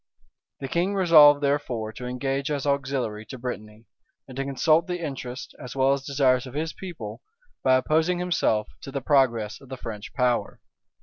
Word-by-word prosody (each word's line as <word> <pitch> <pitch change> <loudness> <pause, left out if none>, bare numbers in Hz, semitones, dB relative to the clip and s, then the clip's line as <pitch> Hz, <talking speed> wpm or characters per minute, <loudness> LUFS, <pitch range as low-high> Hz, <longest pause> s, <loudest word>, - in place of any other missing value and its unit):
The 135 - -3
king 175 +7 0
resolved 155 -6 +7
therefore 125 -6 -1
to 125 +1 -7
engage 135 +3 -2
as 145 -2 -2
auxiliary 130 -6 -1
to 130 - -8
Brittany; 110 -3 -7 0.4
and 130 - -11
to 135 - -2
consult 155 +5 +2
the 180 -1 -2
interests, 135 -5 -6
as 125 - -8
well 135 0 +3
as 140 -1 -3
desires 135 -2 +2
of 130 - -10
his 155 +1 -2
people, 165 - -8 0.4
by 130 -1 +5
opposing 160 +7 +2
himself 170 -12 +1
to 135 - -8
the 140 0 -3
progress 120 -6 +1
of 135 - -15
the 130 - -6
French 110 -4 -7
power. 125 -2 0
135 Hz, 175 wpm, -25 LUFS, 125-150 Hz, 0.4 s, resolved